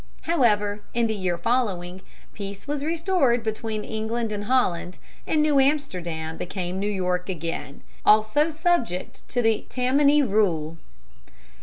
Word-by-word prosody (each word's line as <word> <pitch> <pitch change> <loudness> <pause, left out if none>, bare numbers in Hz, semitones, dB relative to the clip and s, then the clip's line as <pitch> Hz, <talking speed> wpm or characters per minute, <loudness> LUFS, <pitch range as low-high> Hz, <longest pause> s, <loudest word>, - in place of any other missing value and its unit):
However, 210 -10 +2
in 235 -1 +2
the 220 - 0
year 185 -4 -1
following, 185 -4 -1 0.3
peace 200 +1 -7
was 290 -1 -2
restored 320 -7 +1
between 220 -1 -3
England 220 +1 -3
and 205 0 -4
Holland, 185 -8 +1 0.3
and 305 -1 +2
New 295 -2 +3
Amsterdam 175 - -1
became 180 0 -4
New 205 +1 -1
York 180 -2 -1
again, 165 -5 -5 0.2
also 215 +9 +4
subject 315 - -1
to 245 -2 0
the 225 -1 +1
Tammany 280 +3 +3
rule. 170 - 0
215 Hz, 130 wpm, -25 LUFS, 180-265 Hz, 0.3 s, also